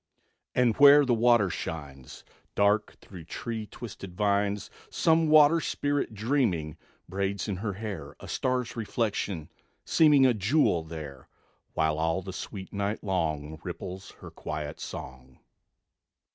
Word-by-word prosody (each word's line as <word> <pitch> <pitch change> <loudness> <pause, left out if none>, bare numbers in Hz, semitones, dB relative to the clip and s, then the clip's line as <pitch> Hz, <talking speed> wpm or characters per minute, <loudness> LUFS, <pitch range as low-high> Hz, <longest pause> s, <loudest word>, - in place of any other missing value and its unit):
And 120 -3 +3
where 145 0 +8
the 125 - +2
water 115 -4 +4
shines 70 -7 -7 0.3
Dark 105 +1 +2
through 90 -5 -11
tree 110 +4 -5
twisted 100 -7 -9
vines, 100 0 0 0.2
Some 160 0 +3
water 155 +1 +6
spirit, 145 -6 -1
dreaming, 105 - 0 0.3
Braids 100 +3 -2
in 100 -3 -2
her 105 +1 -3
hair 95 -9 -6
A - - -10
star's 125 -2 -1
reflection; 105 -7 -2 0.3
seeming 150 -4 +5
A 125 - +5
jewel 105 - +2
there; 75 -5 -9 0.5
While 80 -1 +1
all 80 +3 0
the 95 0 -7
sweet 95 +1 -7
night 100 +1 -2
long 80 -6 -2
Ripples 90 +1 -7
her - - -10
quiet 75 0 -6
song.... 65 0 -9
100 Hz, 130 wpm, -28 LUFS, 80-120 Hz, 0.5 s, where